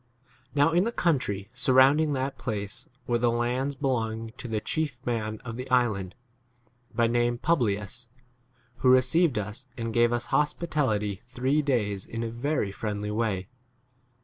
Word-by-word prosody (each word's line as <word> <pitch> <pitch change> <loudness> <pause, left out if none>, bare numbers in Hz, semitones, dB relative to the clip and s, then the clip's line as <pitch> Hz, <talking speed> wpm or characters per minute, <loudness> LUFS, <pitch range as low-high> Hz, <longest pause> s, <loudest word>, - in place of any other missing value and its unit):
7 - - -39
Now 145 +3 +4
in 175 +2 +3
the 230 - -1
country 130 - 0
surrounding 135 +4 +4
that 135 0 -2
place 105 -3 -4 0.2
were 120 -1 +1
the 120 0 +3
lands 125 +4 0
belonging 115 -5 -1
to - - -5
the 110 -2 -1
chief 150 +2 -2
man 110 -3 -2
c - - -19
of 115 -1 -5
the 125 +1 -6
island, 110 -7 +1 0.8
by 120 - +2
name 120 +1 +1
Publius, 120 -5 0 0.7
who 130 - +3
received 130 +3 +4
us 105 +6 -5
and 115 -1 -3
gave 120 0 +4
[us] 120 0 -1
hospitality 135 - 0
three 130 +4 +1
days 105 -9 -1
in 115 0 -4
8 - - -2
a - - -6
very 120 -3 -1
friendly 105 0 -3
way. 105 -4 -1
120 Hz, 160 wpm, -27 LUFS, 110-135 Hz, 0.8 s, Now